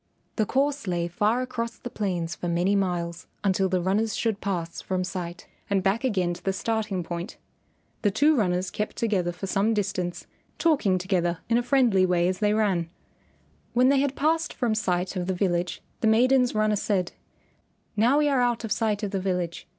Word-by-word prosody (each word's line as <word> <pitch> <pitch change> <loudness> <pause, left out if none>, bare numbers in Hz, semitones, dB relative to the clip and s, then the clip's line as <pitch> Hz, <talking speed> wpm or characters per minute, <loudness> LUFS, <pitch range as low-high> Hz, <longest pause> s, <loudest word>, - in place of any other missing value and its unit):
The 215 -3 +1
course 280 -2 0
lay 175 -1 0
far 210 +8 +1
across 235 -2 -4
the 245 - -8
plains 175 -5 -2
for 175 - -5
many 175 +4 +2
miles 175 -3 -2 0.2
until 190 -1 +2
the 185 0 +1
runners 205 +4 +1
should 220 -3 -1
pass 175 -4 -3
from 185 -1 -2
sight, 180 -1 -5 0.2
and 195 -2 +1
back 200 +5 +1
again 185 -8 +1
to 175 - -11
the 195 - 0
starting 210 -2 -1
point. 170 +5 -6 0.6
The 205 - +3
two 290 +10 +3
runners 185 -5 0
kept 210 - -3
together 195 -6 0
for 180 +3 -6
some 205 +3 +1
distance, 185 -4 -2 0.3
talking 270 - +2
together 175 -2 0
in 235 +1 +4
a - - +1
friendly 240 -7 +3
way 175 -1 +2
as 185 0 -1
they 210 -1 +2
ran. 190 -6 +1 0.8
When 250 +2 +4
they 275 0 +4
had 280 0 0
passed 320 +3 0
from 235 -3 0
sight 185 -3 -1
of 180 -1 -2
the 190 - 0
village 175 -2 -1 0.2
the 225 - +1
maiden's 250 +2 +4
runner 215 0 +2
said, 190 -3 0 0.8
"Now 235 +7 +4
we 300 0 +3
are 275 -3 +2
out 240 -1 +1
of 225 - -5
sight 215 -1 0
of 205 - -2
the 195 -2 -1
village. 180 -3 -2
200 Hz, 190 wpm, -26 LUFS, 180-230 Hz, 0.8 s, in